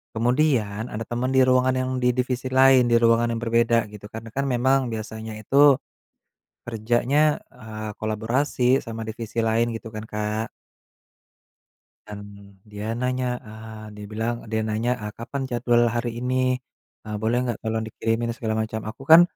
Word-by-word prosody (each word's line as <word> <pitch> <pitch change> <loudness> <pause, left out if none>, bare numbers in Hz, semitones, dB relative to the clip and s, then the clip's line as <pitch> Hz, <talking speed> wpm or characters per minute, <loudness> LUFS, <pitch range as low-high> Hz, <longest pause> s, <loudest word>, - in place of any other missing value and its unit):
kemudian 120 -3 +1
ada 110 -1 -5
teman 120 +3 -2
di 130 - +7
ruangan 130 0 +3
yang 130 0 -1
di 125 0 +2
divisi 125 0 -1
lain 130 -1 +6
di 120 -1 +3
ruangan 115 0 +4
yang 115 - -4
berbeda 115 -1 +2
gitu 105 -1 -11
kan, 110 - -5
kan 140 +4 -1
memang 130 +1 +2
biasanya 110 0 -6
itu, 140 +6 +5 0.9
kerjanya, 120 +7 +1
eee, 110 0 -7
kolaborasi 125 +4 +1
sama 115 -2 -6
divisi 115 +1 -4
lain, 115 +1 +1
gitu 115 0 -6
kan 110 -1 -7
Kak. 105 +1 -3 1.6
Dan, 105 -1 -7 0.4
dia 105 +1 -5
nanya, 125 +1 -1 0.2
eee, 110 0 -9
dia 105 0 -8
bilang 115 +2 -1 0.2
dia 110 0 +1
nanya, 110 +3 0
e - - -4
"Kapan 130 +4 -5
jadwal 120 -1 +3
hari 120 0 -1
ini? 125 +1 -1 0.7
E - - -11
boleh 115 +2 +1 0.2
tolong 110 0 -1
dikirimin," 115 +1 -1
segala 110 -3 -2
macam, 110 0 -4
aku 115 +5 -10
kan, 165 +1 +11
115 Hz, 150 wpm, -24 LUFS, 110-125 Hz, 1.6 s, kan